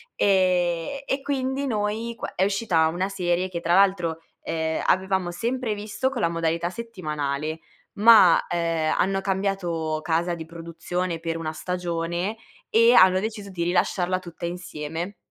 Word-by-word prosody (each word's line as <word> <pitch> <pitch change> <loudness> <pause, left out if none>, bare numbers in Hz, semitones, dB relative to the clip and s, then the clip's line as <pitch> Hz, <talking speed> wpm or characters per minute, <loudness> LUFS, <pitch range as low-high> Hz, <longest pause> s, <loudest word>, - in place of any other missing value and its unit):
Ehm, 185 +3 +2
e 270 0 -1
quindi 270 0 -1
noi 220 -1 -2
qua - - -7
è 185 - +2
uscita 195 -5 +2
una 180 +4 -2
serie 180 -1 -1
che 170 -2 -5
tra 170 +1 +1
l'altro, 180 -4 +3 0.2
ehm, 160 -1 -2
avevamo 190 -1 +1
sempre 235 +4 -2
visto 210 +5 -2
con 265 -3 -4
la 170 - +2
modalità 165 +1 -1
settimanale, 155 -8 -4 0.3
ma, 210 -5 +7
ehm, 165 -2 0
hanno 195 0 +1
cambiato 185 -5 -1
casa 170 +1 0
di 160 - -7
produzione 170 +1 -4
per 165 0 -3
una 155 -1 -3
stagione, 175 +3 -3 0.3
e 230 +2 +5
hanno 185 -4 +6
deciso 215 -1 -5
di 170 -2 -3
rilasciarla 180 +1 +1
tutta 170 -1 -8
insieme. 175 +1 -5
180 Hz, 145 wpm, -24 LUFS, 165-200 Hz, 0.3 s, ma